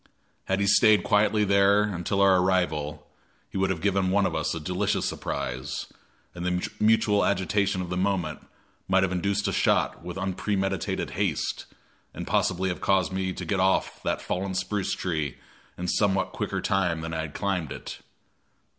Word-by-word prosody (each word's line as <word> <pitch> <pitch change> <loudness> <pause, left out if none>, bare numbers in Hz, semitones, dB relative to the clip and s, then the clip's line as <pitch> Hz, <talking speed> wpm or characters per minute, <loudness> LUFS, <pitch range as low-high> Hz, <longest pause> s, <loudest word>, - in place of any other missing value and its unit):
Had 95 +1 0
he 100 - +2
stayed 105 +1 +5
quietly 105 +1 +3
there 100 +1 +4
until 100 -1 -1
our 95 -1 +6
arrival, 80 -5 0 0.5
he - - -4
would 95 0 +2
have 90 -4 -2
given 95 -2 +2
one 100 +1 +3
of 90 - -1
us 80 0 -1
a - - -3
delicious 90 +4 -1
surprise, 65 +3 -4 0.4
and 85 - -7
the 90 0 -1
mutual 105 -1 +3
agitation 100 0 +1
of 90 - -7
the 90 - -1
moment 90 -5 -1 0.5
might 95 0 +3
have 95 - 0
induced 100 +3 0
a - - 0
shot - - +1
with 90 +1 -6
unpremeditated 95 0 -2
haste, - - -2 0.5
and - - -5
possibly 95 +1 +1
have 90 - -4
caused 95 -5 +2
me 95 0 -1
to - - -6
get 100 -2 0
off 95 +1 +1
that - - -2
fallen 95 +1 -2
spruce 95 +2 -1
tree 80 -7 -2 0.4
in 90 - -4
somewhat 95 0 +1
quicker - - -3
time 90 -4 0
than 80 +1 -5
I 80 - -1
had 80 -2 -7
climbed 95 -6 -1
it. - - -7
95 Hz, 170 wpm, -26 LUFS, 90-100 Hz, 0.5 s, our